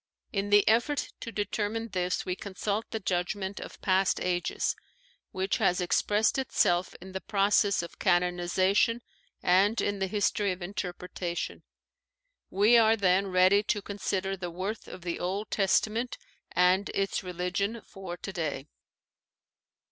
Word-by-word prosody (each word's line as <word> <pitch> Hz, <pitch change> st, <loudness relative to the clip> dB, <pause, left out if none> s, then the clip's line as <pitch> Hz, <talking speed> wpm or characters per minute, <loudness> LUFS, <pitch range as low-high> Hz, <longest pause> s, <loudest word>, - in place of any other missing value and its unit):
In 200 Hz, 0 st, -1 dB
the 205 Hz, 0 st, +5 dB
effort 240 Hz, +6 st, +2 dB
to 230 Hz, -, -6 dB
determine 215 Hz, +2 st, -2 dB
this 180 Hz, -2 st, -1 dB
we 180 Hz, -, -2 dB
consult 200 Hz, +3 st, -3 dB
the 220 Hz, -, -3 dB
judgment 190 Hz, +1 st, -2 dB
of -, -, -9 dB
past 190 Hz, 0 st, +2 dB
ages, 175 Hz, -1 st, -1 dB, 0.5 s
which 190 Hz, +1 st, -1 dB
has 180 Hz, -, +2 dB
expressed 210 Hz, +6 st, +2 dB
itself 180 Hz, -8 st, +1 dB
in 190 Hz, +1 st, -10 dB
the 190 Hz, 0 st, -5 dB
process 200 Hz, -2 st, +2 dB
of 170 Hz, -, -10 dB
canonization 180 Hz, +6 st, +2 dB, 0.4 s
and 195 Hz, +5 st, +4 dB
in 205 Hz, -1 st, -1 dB
the 190 Hz, -, 0 dB
history 205 Hz, 0 st, +1 dB
of 180 Hz, 0 st, -5 dB
interpretation. 180 Hz, -2 st, -4 dB, 0.9 s
We 210 Hz, +5 st, +5 dB
are 220 Hz, 0 st, +5 dB
then 195 Hz, -1 st, +2 dB
ready 185 Hz, +2 st, +5 dB
to 205 Hz, -1 st, -1 dB
con 200 Hz, 0 st, -7 dB
sider 195 Hz, 0 st, -1 dB
the 180 Hz, -2 st, -5 dB
worth 190 Hz, +6 st, -5 dB
of 180 Hz, -, -10 dB
the 175 Hz, -1 st, -3 dB
Old 195 Hz, +4 st, -3 dB
Testament 220 Hz, +4 st, +1 dB, 0.3 s
and 180 Hz, +3 st, +3 dB
its 195 Hz, 0 st, 0 dB
religion 180 Hz, +5 st, -2 dB
for 190 Hz, -3 st, -8 dB
today. 165 Hz, -7 st, -4 dB
195 Hz, 140 wpm, -29 LUFS, 180-205 Hz, 0.9 s, the